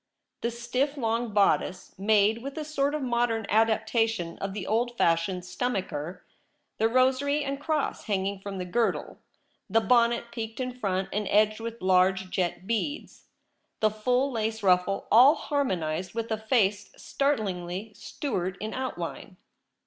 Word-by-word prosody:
The 235 Hz, -, 0 dB
stiff 250 Hz, +5 st, -2 dB
long 230 Hz, -2 st, -1 dB
bodice, 195 Hz, -2 st, +1 dB
made 210 Hz, +2 st, +3 dB
with 275 Hz, +3 st, -7 dB
a 310 Hz, -, -3 dB
sort 290 Hz, -1 st, 0 dB
of 300 Hz, -, -3 dB
modern 235 Hz, -3 st, 0 dB
adaptation 220 Hz, -4 st, +1 dB
of 195 Hz, 0 st, -4 dB
the 205 Hz, -, -4 dB
old 240 Hz, +2 st, 0 dB
fashioned 170 Hz, +2 st, +1 dB
stomacher; 180 Hz, -, -3 dB, 0.5 s
the 225 Hz, -, +3 dB
rosary 265 Hz, +4 st, +2 dB
and 275 Hz, 0 st, -3 dB
cross 300 Hz, -1 st, -2 dB
hanging 200 Hz, -2 st, -1 dB
from 195 Hz, 0 st, -6 dB
the 180 Hz, -, -3 dB
girdle; 230 Hz, +6 st, -1 dB, 0.5 s
the 225 Hz, -, +4 dB
bonnet 235 Hz, +1 st, +2 dB
peaked 225 Hz, -1 st, -6 dB
in 255 Hz, -1 st, -2 dB
front 195 Hz, -6 st, -2 dB
and 210 Hz, 0 st, -1 dB
edged 215 Hz, +1 st, +3 dB
with 230 Hz, -2 st, -6 dB
large 185 Hz, 0 st, +3 dB
jet 175 Hz, 0 st, -1 dB
beads; 230 Hz, +8 st, -3 dB, 0.5 s
the 215 Hz, -1 st, +3 dB
full 250 Hz, +6 st, +1 dB
lace 220 Hz, -2 st, -2 dB
ruffle 185 Hz, +1 st, +2 dB
— -, -, -34 dB
all 260 Hz, +7 st, +8 dB
harmonized 185 Hz, -, -2 dB
with 230 Hz, 0 st, -3 dB
a 220 Hz, -, +1 dB
face 210 Hz, -3 st, +1 dB
startlingly 205 Hz, -7 st, -2 dB
Stuart 190 Hz, -8 st, -4 dB
in 215 Hz, +2 st, -4 dB
outline. 190 Hz, -6 st, -5 dB
220 Hz, 150 wpm, -27 LUFS, 190-245 Hz, 0.5 s, all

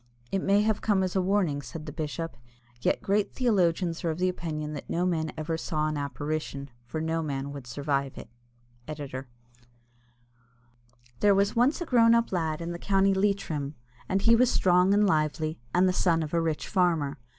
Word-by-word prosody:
"It 195 Hz, -, 0 dB
may 200 Hz, +2 st, +3 dB
have 215 Hz, -1 st, 0 dB
come 200 Hz, -3 st, +2 dB
as 185 Hz, 0 st, -2 dB
a 190 Hz, -, +3 dB
warning," 180 Hz, -7 st, +1 dB
said 155 Hz, +2 st, -8 dB
the 150 Hz, -, -6 dB
bishop; 155 Hz, +1 st, -4 dB, 0.5 s
"yet -, -, 0 dB
great 200 Hz, +1 st, 0 dB
theologians 180 Hz, -8 st, +1 dB
are 170 Hz, -, 0 dB
of 160 Hz, +1 st, -3 dB
opinion 160 Hz, -4 st, -2 dB
that 145 Hz, -, -8 dB
no 175 Hz, +2 st, 0 dB
man 160 Hz, -3 st, 0 dB
ever 160 Hz, +1 st, -2 dB
saw 155 Hz, -1 st, -1 dB
an 155 Hz, -, -2 dB
apparition, 140 Hz, 0 st, -4 dB, 0.2 s
for 155 Hz, -, -4 dB
no 160 Hz, +1 st, -1 dB
man 140 Hz, -2 st, -3 dB
would 140 Hz, -3 st, -8 dB
survive 140 Hz, 0 st, -2 dB
it." -, -, -8 dB, 0.6 s
ED.] 140 Hz, -3 st, -6 dB, 1.9 s
There 205 Hz, -1 st, +5 dB
was 200 Hz, +3 st, +2 dB
once 250 Hz, +8 st, +2 dB
a -, -, -1 dB
grown 230 Hz, -4 st, +5 dB
up 235 Hz, 0 st, +1 dB
lad 160 Hz, -3 st, -1 dB
in 170 Hz, +1 st, -4 dB
the 170 Hz, -, -6 dB
County 195 Hz, 0 st, +3 dB
Leitrim, 190 Hz, -8 st, -1 dB, 0.3 s
and 195 Hz, +1 st, 0 dB
he 230 Hz, 0 st, +6 dB
was 250 Hz, +1 st, +4 dB
strong 180 Hz, -2 st, +3 dB
and 210 Hz, 0 st, +4 dB
lively, 155 Hz, -, 0 dB
and 180 Hz, +6 st, +4 dB
the 185 Hz, -, +2 dB
son 165 Hz, -3 st, +2 dB
of 155 Hz, -, -6 dB
a 170 Hz, -, +2 dB
rich 160 Hz, -2 st, -2 dB
farmer. 165 Hz, -, +1 dB
165 Hz, 185 wpm, -28 LUFS, 150-195 Hz, 1.9 s, he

